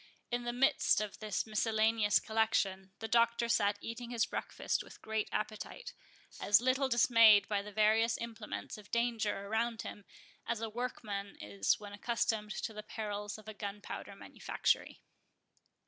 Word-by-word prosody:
In 240 0 -1
the 240 - 0
midst 270 +4 +3
of 210 -2 -4
this 215 -2 -2
miscellaneous 220 -1 +2
collection, 195 -4 0
the 225 - -5
Doctor 235 +1 +3
sat 205 -3 +2
eating 235 +1 -6
his 235 -2 +1
breakfast - - -2
with - - -14
great 220 -1 -2
appetite, 465 - -4 0.5
as 205 - +5
little 260 +2 +1
dismayed 230 -4 +6
by 205 -1 0
the 210 +1 -9
various 220 +2 +3
implements 225 -1 -6
of 210 - -15
danger 230 -4 0
around 225 +2 -1
him, 205 - -8 0.4
as 235 - -1
a 225 0 -3
workman 210 -4 -4
is 100 -1 0
when 205 -1 -9
accustomed 220 0 -1
to 220 - -3
the 210 - -6
perils 210 -1 -5
of 215 -1 -15
a 215 - -6
gunpowder 205 0 -6
manufactory. - - -1
220 Hz, 150 wpm, -33 LUFS, 205-235 Hz, 0.5 s, dismayed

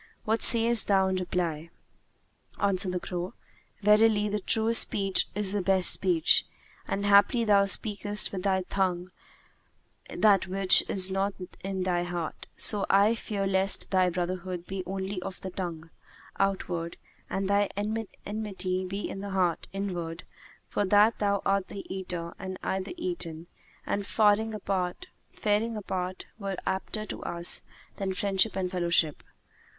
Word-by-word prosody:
What 220 +1 0
sayest 230 -2 +4
thou 190 -2 +3
in 190 - -1
reply?" 170 -3 -3 0.9
Answered 195 -1 0
the 180 - -1
crow, 180 +1 -5 0.5
"Verily, 210 0 +4
the 210 +1 -1
truest 225 +3 +4
speech 195 -2 +1
is 205 -2 -1
the 205 -1 -1
best 190 0 +4
speech; 175 -3 +3 0.4
and 200 +1 -2
haply 205 +4 +5
thou 200 -2 +4
speakest 205 +1 +3
with 190 - -4
thy 190 -1 0
tongue 180 -1 -2 1.0
that 200 -3 +3
which 190 0 +7
is 190 -1 0
not 195 +1 -1 0.3
in 190 -1 -3
thy 180 -1 0
heart; 175 -2 -5
so 205 -2 +6
I 200 +3 +4
fear 210 -3 -3
lest 195 0 +1
thy 185 -1 +3
brotherhood 180 0 -4
be 190 0 -5
only 190 0 -4
of 190 0 -7
the 190 - -6
tongue, 170 -3 -6 0.5
outward, 180 -4 -2 0.3
and 195 0 -2
thy 200 0 +2
enmity 205 -3 -3
be 195 +2 -4
in - - -7
the 200 - -6
heart, 185 -3 0
inward; 180 -4 -5 0.4
for - - -1
that 205 +3 +4
thou 200 -1 0
art 195 -1 +1
the 200 - -8
Eater 175 -3 -5
and 190 -1 -6
I 190 - -1
the 190 - -7
Eaten, 180 - -4 0.4
and 200 - -2
faring 215 +1 +2
apart 190 -3 -3 0.3
were 200 -2 -3
apter 215 +3 -3
to - - -7
us 170 0 -1 0.4
than 190 -2 -3
friendship 200 +2 +1
and 185 -2 -2
fellowship. 170 -4 +1
195 Hz, 145 wpm, -28 LUFS, 180-205 Hz, 1.0 s, which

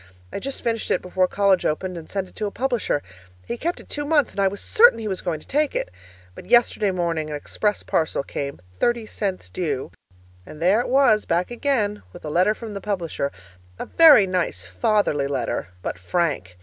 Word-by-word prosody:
I - - -3
just 275 +5 -5
finished 230 -1 -1
it - - +1
before 185 0 +1
college 195 -1 +2
opened 180 +4 -1
and 165 -2 -9
sent 195 -2 -3
it - - -21
to 210 - -1
a - - -2
publisher. 240 - -1 0.4
He - - -3
kept 340 +8 -3
it - - -14
two 290 - -4
months, 290 -2 +2
and - - -7
I 195 - +4
was 200 +1 -4
certain 480 +3 +5
he 225 -1 -5
was 190 -3 -3
going 170 -4 -2
to - - -14
take 295 0 0
it; - - -2 0.4
but - - -12
yesterday 235 -3 +4
morning 170 -4 -1
an 150 - -4
express 205 +7 -2
parcel 160 -3 0
came 140 0 -5 0.2
(thirty 240 -2 +1
cents 195 - -3
due) 140 - -3 0.5
and 150 - -12
there 185 +6 +4
it 245 - -2
was 250 -5 +4
back 175 +5 0
again 240 -5 0
with - - -11
a 150 - -4
letter 185 +6 +3
from 225 -2 -8
the 200 - -6
publisher, 170 -8 -2 0.5
a - - -5
very 310 -11 +7
nice, 180 - -2
fatherly 140 - +1
letter 135 -9 -2 0.2
but - - -4
frank! 95 - -1
195 Hz, 205 wpm, -23 LUFS, 160-230 Hz, 0.5 s, very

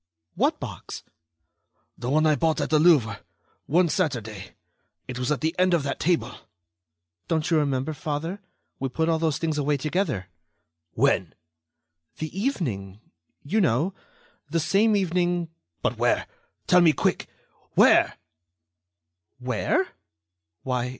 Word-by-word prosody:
"What - - +1
box?" - - -7 0.9
"The 120 - -5
one 155 +3 +3
I 155 - +5
bought 160 +2 +1
at - - -2
the 155 - +5
Louvre... 150 -9 +4 0.5
one 175 +4 +3
Saturday... 115 - -3 0.5
it 125 -1 -5
was 125 +3 -1
at 150 - 0
the 160 +1 0
end 185 -1 +4
of 160 - 0
that 140 - -3
table." 170 +1 0 0.9
"Don't 160 0 0
you 165 - +4
remember, 140 +1 -1
father, 155 +7 -4 0.4
we 135 - -2
put 160 +5 0
all 160 -1 +2
those 160 -3 +1
things 155 -2 -1
away 145 0 +1
together." 150 - -1 0.7
"When?" - - +1 0.8
"The 155 +1 -5
evening... 120 - -2 0.4
you 210 +10 +1
know... 160 - +1 0.6
the 165 +2 0
same 200 +8 +3
evening...." 175 -2 0 0.3
"But - - -1
where?... - - +2 0.4
Tell 180 0 +5
me, 165 -3 +6
quick!... - - 0 0.5
Where?" - - +5 1.2
"Where? 125 -3 0
155 Hz, 130 wpm, -25 LUFS, 135-175 Hz, 1.2 s, me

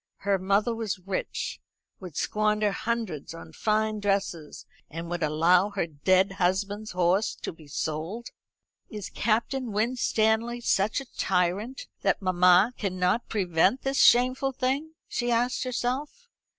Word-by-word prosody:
Her 200 -1 +2
mother 200 +5 +1
was 220 -3 -3
rich, 185 +1 -4 0.4
would 180 -6 -9
squander 210 0 +1
hundreds 220 -9 -3
on 85 -1 -11
fine 215 0 0
dresses, 195 -6 -2 0.2
and 165 +2 -6
would 175 0 -3
allow 165 +5 +3
her 200 -4 -1
dead 185 +5 +2
husband's 200 +4 0
horse 180 +4 +1
to - - -6
be 160 -2 -16
sold. 160 - -4 0.6
"Is 210 -3 -7
Captain 235 +3 0
Winstanley 225 +1 +1
such 215 +3 +1
a 270 - -15
tyrant 190 +7 0 0.2
that 195 - +1
mamma 185 +3 +4
can 190 -3 -2
not 180 +6 +1
prevent 190 +3 +1
this 270 0 +1
shameful 255 +3 +4
thing?" 275 +5 -2
she 240 0 -2
asked 245 +3 +1
herself. 260 - -3
205 Hz, 135 wpm, -27 LUFS, 180-235 Hz, 0.6 s, mamma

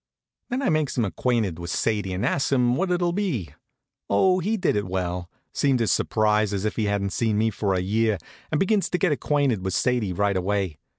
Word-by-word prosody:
Then 255 +3 -2
I - - +2
makes 155 -5 0
him 120 - +2
acquainted 105 -4 -1
with 85 0 -6
Sadie, 105 +1 -1
and 90 +2 -2
asks 140 - 0
him 125 -2 +3
what 185 +6 0
it'll 175 -1 +1
be. 175 - -2 0.6
Oh, 185 - +3
he 210 +5 0
did 185 - +1
it 100 -2 -1
well; 90 -1 -3 0.2
seemed 135 -3 +2
as 115 - +1
surprised 105 -1 +1
as 100 +1 -2
if 110 - -1
he 110 - 0
hadn't 100 -1 -1
seen 110 -3 0
me 110 +1 +2
for 100 -2 -1
a 90 - 0
year, 110 +2 +1 0.3
and 155 - 0
begins 195 0 +2
to 180 - 0
get 185 -2 +2
acquainted 140 -8 +1
with 95 -1 -1
Sadie 120 -6 +1
right 100 +2 0
away. 95 -3 -1
110 Hz, 215 wpm, -24 LUFS, 100-145 Hz, 0.6 s, him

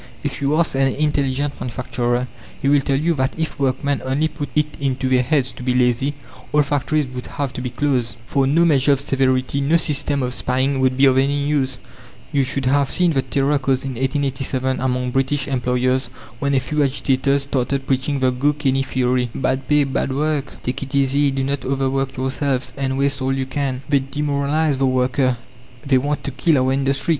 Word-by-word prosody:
If - - -4
you 140 +2 +1
ask 170 0 +2
an 135 0 +2
intelligent 140 0 -1
manufacturer, 125 0 -2 0.3
he 135 - -1
will 145 0 +4
tell 135 0 0
you 165 +4 +1
that 130 -3 -1
if 160 -2 -3
workmen 140 +1 0
only 135 +4 +1
put 150 -1 -6
it 150 0 +1
into 135 -1 -1
their 130 -1 +3
heads 130 0 +1
to - - -12
be 125 0 0
lazy, 125 +3 +2 0.4
all 150 0 +4
factories 145 +1 0
would 125 -1 -7
have 140 -3 -4
to - - -5
be 125 - -3
closed, 125 -4 -1
for 135 +1 +1
no 165 +5 +4
measure 145 -3 +4
of 135 - 0
severity, 135 0 0
no 150 +5 +3
system 145 -3 0
of 125 0 -1
spying 130 +2 0
would 130 -1 +2
be 135 - +5
of 130 -1 +5
any 140 +1 +1
use. 135 -3 0 0.5
You 140 -3 +2
should 135 +1 -2
have 140 +1 +2
seen 175 -2 +2
the 135 - +2
terror 140 +2 +1
caused 135 -1 0
in 135 - -3
1887 130 0 -1
among 125 -1 -1
British 135 +2 0
employers 130 -1 0 0.3
when 140 +1 0
a - - +4
few 150 +4 -1
agitators 140 0 +1
started 135 0 -1
preaching 135 +1 0
the 130 -1 +3
"go 140 +4 +1
canny" 135 -2 0
theory 125 -2 0
"Bad 130 0 -1
pay, 150 -1 +4
bad 135 0 -1
work"; 150 -1 -2
"Take 125 - -3
it 140 +1 -5
easy, 140 +1 +3
do 135 0 -1
not 140 +1 -2
overwork 135 0 -1
yourselves, 130 0 -1
and 135 -1 -2
waste 140 0 0
all 130 +1 0
you 135 0 -1
can." 130 -1 -3
"They 145 -1 +3
demoralize 145 +1 0
the 135 - +3
worker, 130 0 +1 0.5
they 135 -2 +3
want 145 +3 -2
to 140 - -3
kill 140 +4 +2
our 130 0 +2
industry!" 135 +2 -1
135 Hz, 200 wpm, -20 LUFS, 130-145 Hz, 0.5 s, be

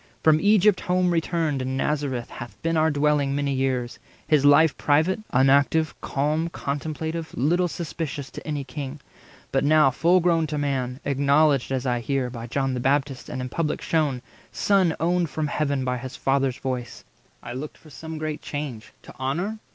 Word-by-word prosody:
From 155 -1 +5
Egypt 205 -1 +4
home 180 0 +1
returned, 165 -4 0
in 130 +1 -2
Nazareth 135 -4 -2
Hath 120 0 -9
been 165 0 +1
our 160 0 +3
dwelling 145 -2 +1
many 140 -1 0
years; 130 -2 -1 0.3
his 150 -3 +3
life 145 +2 +6
80 - - -28
Private, 155 +7 +2
unactive, 140 +4 +3
calm, 155 +4 -1
contemplative, 160 +2 -4
Little 175 +8 +2
suspicious 155 -3 -5
to - - -9
any 150 -2 -2
king. 140 +2 -6 0.5
But 135 - +1
now, 150 -2 +5
Full 170 +8 +3
grown 165 -2 +2
to 150 0 -3
man, 135 -3 -2
acknowledged, 140 0 +3
as 130 0 -1
I 125 -1 +1
hear, 130 +1 -1
By 120 -1 -7
John 135 +2 -1
the 125 - -2
Baptist, 135 +1 0
and 125 - -4
in 125 - -5
public 155 +3 -1
shewn, 145 -6 0 0.3
Son 190 -5 +2
owned 175 0 +1
from 155 0 -2
Heaven 140 -2 -1
by 125 -1 -1
his 130 +2 -7
Father's 135 -1 0
voice, 125 -3 -5 0.4
I 120 - -6
looked 140 +4 -6
for 155 - -17
some 160 +3 -7
great 155 0 -4
change. 140 -7 -6
To - - -12
honour? 175 +12 -2
145 Hz, 175 wpm, -24 LUFS, 135-160 Hz, 0.5 s, life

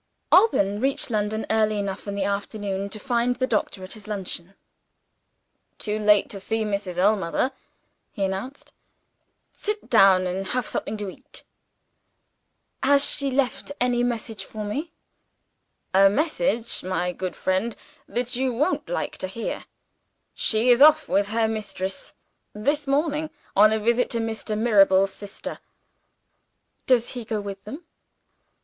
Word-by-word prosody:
Alban 205 - +4
reached 265 0 0
London 215 0 -1
early 215 -1 +2
enough 200 0 -4
in 200 - -3
the 200 - -1
afternoon 200 0 -3
to 215 - -6
find 245 +1 0
the 255 - 0
doctor 210 -5 -1
at 185 - -6
his 215 -2 -10
luncheon. 195 -2 -3 1.2
"Too 210 0 -3
late 210 -1 +4
to 200 - -5
see 220 +3 -1
Mrs. 200 -4 -3
Ellmother," 200 +5 +2 0.6
he 200 - -3
announced. 195 +9 -4 0.8
"Sit 420 0 -4
down 195 -4 +6
and 190 +2 -3
have 250 +1 -1
something 215 - -2
to 205 -1 -4
eat." 270 +8 -11 1.4
"Has 280 +1 +5
she 280 -1 +1
left 270 +1 -1
any 245 -1 +2
message 225 -4 -2
for 215 +2 -7
me?" 285 +11 -4 1.0
"A 195 +1 +7
message, 230 - 0
my 180 -1 -1
good 185 +1 -5
friend, 190 +5 -1 0.3
that 245 0 -2
you 260 +1 0
won't 290 +10 -1
like - - -3
to - - -3
hear. 225 +5 -5 0.7
She 225 +3 +2
is 245 +2 +4
off 310 +1 +7
with 200 0 +2
her 225 +1 +1
mistress, 205 -3 -4 0.4
this 285 +7 0
morning, 300 +2 0 0.3
on 215 +2 +7
a 220 - +2
visit 235 +3 +1
to 235 - -1
Mr. 220 -1 -3
Mirabel's 195 -4 +4
sister." 205 0 -7 1.3
"Does 245 -2 +3
he 245 -2 -6
go 220 -1 -2
with 200 -1 -7
them?" 285 +11 -8
215 Hz, 140 wpm, -24 LUFS, 195-250 Hz, 1.4 s, A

